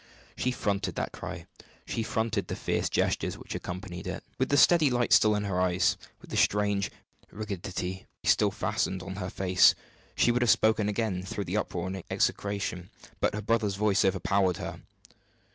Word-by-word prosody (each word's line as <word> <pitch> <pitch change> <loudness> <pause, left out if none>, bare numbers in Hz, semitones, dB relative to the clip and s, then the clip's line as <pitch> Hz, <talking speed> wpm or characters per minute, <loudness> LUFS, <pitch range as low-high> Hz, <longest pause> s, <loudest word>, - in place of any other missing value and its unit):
She 125 - 0
fronted 105 -5 -1
that - - -2
cry, - - -7 0.4
she 115 - -2
fronted 110 -3 -1
the - - -3
fierce - - -1
gestures - - 0
which - - -8
accompanied 90 0 -6
it, 95 -1 -5 0.2
with 130 - +1
the 145 - +3
steady 160 0 +6
light 120 -1 +2
still 105 -1 +6
in 105 - -1
her 95 -3 -1
eyes, 90 0 +2 0.3
with - - -14
the - - -2
strange 100 -1 +2 0.4
rigidity 95 -3 -5 0.2
still - - +4
fastened 95 -1 -2
on 95 0 -6
her 90 -2 -3
face. 95 -1 +4 0.4
She 120 - +4
would 125 +1 +1
have 120 - +2
spoken 110 -1 +3
again 105 -3 -1
through 100 +2 -4
the 90 +5 -2
uproar 90 -4 -2
and 95 -1 -5
execration, 100 -3 -1 0.3
but - - +1
her 105 - -4
brother's 110 -2 +1
voice 105 0 +2
overpowered 95 -1 +1
her. - - -6
100 Hz, 175 wpm, -28 LUFS, 95-110 Hz, 0.4 s, steady